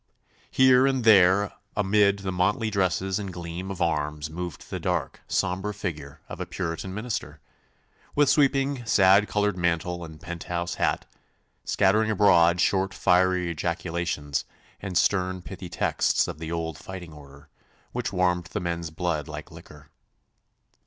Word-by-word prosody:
Here 130 Hz, 0 st, +5 dB
and 135 Hz, -2 st, 0 dB
there 100 Hz, -2 st, +5 dB, 0.2 s
amid 100 Hz, 0 st, +3 dB
the 95 Hz, -, -1 dB
motley 110 Hz, +6 st, 0 dB
dresses 95 Hz, 0 st, 0 dB
and 100 Hz, -2 st, -5 dB
gleam 85 Hz, +1 st, -6 dB
of 95 Hz, -2 st, -2 dB
arms 75 Hz, -1 st, -2 dB
moved 85 Hz, -1 st, -7 dB
the -, -, -3 dB
dark, -, -, -2 dB
sombre 100 Hz, +2 st, -1 dB
figure 75 Hz, -8 st, -6 dB
of -, -, -8 dB
a -, -, -4 dB
Puritan 90 Hz, +1 st, -4 dB
minister, 110 Hz, +4 st, -5 dB, 0.8 s
with 145 Hz, -1 st, +4 dB
sweeping 135 Hz, -2 st, +2 dB
sad 100 Hz, -1 st, +5 dB
coloured 105 Hz, -1 st, 0 dB
mantle 85 Hz, 0 st, -1 dB
and 80 Hz, -2 st, -10 dB
penthouse 85 Hz, 0 st, -4 dB
hat, -, -, +1 dB, 0.6 s
scattering 105 Hz, +3 st, +2 dB
abroad 90 Hz, -5 st, +4 dB
short 95 Hz, +1 st, +1 dB
fiery 90 Hz, -1 st, +2 dB
ejaculations 85 Hz, -3 st, -2 dB, 0.4 s
and 95 Hz, -3 st, -2 dB
stern 95 Hz, -1 st, +1 dB
pithy 90 Hz, 0 st, -8 dB
texts 85 Hz, -, +1 dB
of -, -, -6 dB
the 80 Hz, 0 st, -5 dB
old 80 Hz, -1 st, -3 dB
fighting 90 Hz, -4 st, -9 dB
order, 70 Hz, 0 st, -15 dB, 0.4 s
which -, -, -3 dB
warmed 90 Hz, -1 st, +1 dB
the 100 Hz, +5 st, -4 dB
men's 85 Hz, -2 st, -3 dB
blood 80 Hz, -2 st, -2 dB
like -, -, -8 dB
liquor. -, -, -14 dB
90 Hz, 140 wpm, -26 LUFS, 85-100 Hz, 0.8 s, Here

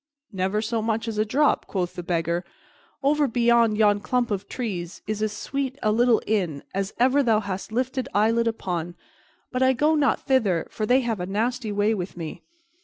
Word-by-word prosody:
"Never 190 Hz, +3 st, 0 dB
so 225 Hz, 0 st, -1 dB
much 225 Hz, +1 st, -1 dB
as 220 Hz, -2 st, -3 dB
a 215 Hz, -, +3 dB
drop," 285 Hz, +7 st, +2 dB
quoth 180 Hz, -3 st, -2 dB
the -, -, -5 dB
Beggar. 170 Hz, 0 st, -1 dB, 0.6 s
"Over 290 Hz, +1 st, +3 dB
beyond 235 Hz, -2 st, +3 dB
yon 205 Hz, -1 st, +4 dB
clump 245 Hz, +2 st, -1 dB
of 200 Hz, 0 st, -2 dB
trees 190 Hz, -8 st, -5 dB
is 215 Hz, 0 st, -3 dB
as 215 Hz, -1 st, 0 dB
sweet 265 Hz, +5 st, -3 dB
a 215 Hz, -, +3 dB
little 235 Hz, +1 st, +3 dB
inn 180 Hz, -10 st, -1 dB
as 195 Hz, +1 st, -2 dB
ever 260 Hz, +4 st, +4 dB
thou 225 Hz, -5 st, +3 dB
hast 195 Hz, -1 st, -5 dB
lifted 255 Hz, +2 st, -1 dB
eyelid 225 Hz, +3 st, +2 dB
upon; 175 Hz, -6 st, -3 dB, 0.6 s
but 255 Hz, -, -2 dB
I 260 Hz, 0 st, +5 dB
go 295 Hz, +5 st, +2 dB
not 295 Hz, -3 st, +2 dB
thither, 215 Hz, -11 st, +2 dB
for 215 Hz, -, -3 dB
they 255 Hz, +3 st, +4 dB
have 230 Hz, -5 st, -2 dB
a 180 Hz, -, -3 dB
nasty 225 Hz, +3 st, -1 dB
way 205 Hz, +2 st, +2 dB
with 185 Hz, -3 st, -5 dB
me. 165 Hz, 0 st, -6 dB
220 Hz, 190 wpm, -24 LUFS, 195-245 Hz, 0.6 s, I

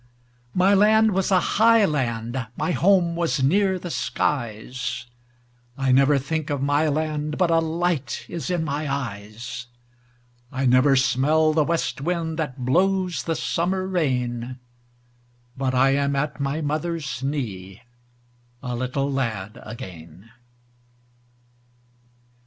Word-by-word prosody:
My 185 Hz, +2 st, +4 dB
land 215 Hz, +2 st, +5 dB
was 190 Hz, -1 st, 0 dB
a 190 Hz, -2 st, +5 dB
high 225 Hz, +3 st, +4 dB
land; 120 Hz, -, -2 dB
my -, -, 0 dB
home 175 Hz, -2 st, +3 dB
was 165 Hz, -5 st, 0 dB
near 190 Hz, +6 st, +3 dB
the 175 Hz, -1 st, -6 dB
skies.I 120 Hz, 0 st, -4 dB
never 140 Hz, +2 st, +5 dB
think 155 Hz, +3 st, -3 dB
of 145 Hz, -2 st, -1 dB
my 145 Hz, +3 st, +2 dB
land 150 Hz, 0 st, -1 dB
but 180 Hz, -2 st, +2 dB
a 165 Hz, -, +4 dB
light 165 Hz, -3 st, -1 dB
is 170 Hz, +1 st, -5 dB
in 175 Hz, -3 st, 0 dB
my 145 Hz, -1 st, -2 dB, 1.6 s
eyes;I 135 Hz, -1 st, -2 dB
never 130 Hz, +2 st, +5 dB
smell 135 Hz, +5 st, +3 dB
the 155 Hz, -1 st, +3 dB
west 165 Hz, -3 st, -1 dB
wind 165 Hz, 0 st, -2 dB
that 135 Hz, -5 st, -3 dB
blows 185 Hz, +5 st, +1 dB
the 165 Hz, -, -2 dB
summer 170 Hz, +10 st, -1 dB
rain—But 120 Hz, -4 st, -4 dB
I 135 Hz, +1 st, +4 dB
am 140 Hz, 0 st, +1 dB
at 145 Hz, +2 st, -2 dB
my 140 Hz, +3 st, -1 dB
mother's 155 Hz, -2 st, -3 dB
knee, 110 Hz, -8 st, -4 dB, 0.8 s
a 125 Hz, -1 st, -3 dB
little 130 Hz, +3 st, -2 dB
lad 110 Hz, -7 st, -3 dB
again. 95 Hz, -2 st, -10 dB
140 Hz, 120 wpm, -23 LUFS, 125-165 Hz, 1.6 s, land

